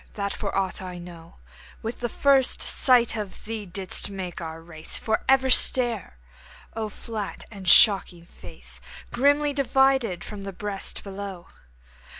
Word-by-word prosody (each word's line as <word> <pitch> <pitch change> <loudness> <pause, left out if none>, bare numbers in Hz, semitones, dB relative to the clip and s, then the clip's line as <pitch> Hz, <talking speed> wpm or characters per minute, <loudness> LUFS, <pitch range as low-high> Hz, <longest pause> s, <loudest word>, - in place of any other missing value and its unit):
that 200 -1 -3
for 200 - -5
aught 190 -1 -1
I 180 -1 -8
know, 170 -1 -13 0.5
With 225 +2 -5
the 240 - -3
first 275 +1 +2
sight 245 -3 +3
of 210 -3 -7
thee 215 -2 -6
didst 185 +2 0
make 185 -4 -7
our 160 -1 -7
race 165 -1 -5
For 220 - -2
ever 265 -1 +3
stare! 235 - +5 0.6
O 220 -1 -4
flat 210 -1 -6
and 195 -4 -10
shocking 180 -3 +5
face, - - -11 0.3
Grimly 285 +3 +1
divided 265 -8 +1
from 210 -2 -9
the 195 0 -7
breast 200 +1 -5
below! 195 -3 -8
205 Hz, 145 wpm, -24 LUFS, 185-240 Hz, 0.6 s, stare